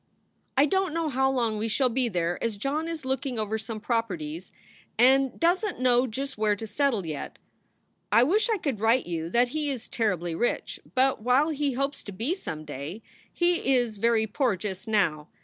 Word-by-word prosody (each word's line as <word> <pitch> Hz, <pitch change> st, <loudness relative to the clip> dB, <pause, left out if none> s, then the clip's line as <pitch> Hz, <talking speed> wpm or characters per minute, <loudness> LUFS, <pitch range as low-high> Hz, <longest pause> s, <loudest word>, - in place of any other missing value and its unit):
I 280 Hz, -, +6 dB
dont 380 Hz, +1 st, 0 dB
know 330 Hz, -2 st, 0 dB
how 265 Hz, 0 st, +2 dB
long 230 Hz, -5 st, 0 dB
we 220 Hz, -, -1 dB
shall 255 Hz, +4 st, +2 dB
be 250 Hz, 0 st, 0 dB
there 175 Hz, -3 st, -1 dB
as 230 Hz, -3 st, -1 dB
John 290 Hz, +9 st, -2 dB
is 325 Hz, -4 st, -5 dB
looking 265 Hz, -1 st, -2 dB
over 220 Hz, 0 st, -1 dB
some 220 Hz, 0 st, -6 dB
properties 185 Hz, -8 st, -3 dB, 0.5 s
and 265 Hz, +2 st, +4 dB
doesnt 360 Hz, -, +1 dB
know 250 Hz, 0 st, +4 dB
just 270 Hz, +1 st, -5 dB
where 210 Hz, -1 st, +2 dB
to 225 Hz, -, -6 dB
settle 225 Hz, -2 st, 0 dB
yet. 155 Hz, -3 st, -5 dB, 0.7 s
I 235 Hz, -, +6 dB
wish 410 Hz, -, +2 dB
I 445 Hz, -, +2 dB
could 280 Hz, -, -2 dB
write 225 Hz, +4 st, +3 dB
you 165 Hz, -1 st, -3 dB
that 240 Hz, +6 st, +3 dB
he 300 Hz, +2 st, -2 dB
is 260 Hz, -5 st, -4 dB
terribly 180 Hz, -7 st, -1 dB
rich, 240 Hz, +9 st, -1 dB, 0.2 s
but 260 Hz, -2 st, +3 dB
while 255 Hz, +7 st, +3 dB
he 290 Hz, -3 st, -1 dB
hopes 275 Hz, +2 st, -2 dB
to 205 Hz, -, -6 dB
be 225 Hz, -, -1 dB
some 155 Hz, -, -6 dB
day, 150 Hz, +9 st, -7 dB, 0.3 s
he 345 Hz, -6 st, +2 dB
is 240 Hz, -4 st, 0 dB
very 225 Hz, +1 st, +2 dB
poor 230 Hz, 0 st, 0 dB
just 190 Hz, 0 st, -6 dB
now. 170 Hz, -9 st, +1 dB
240 Hz, 190 wpm, -27 LUFS, 210-275 Hz, 0.7 s, I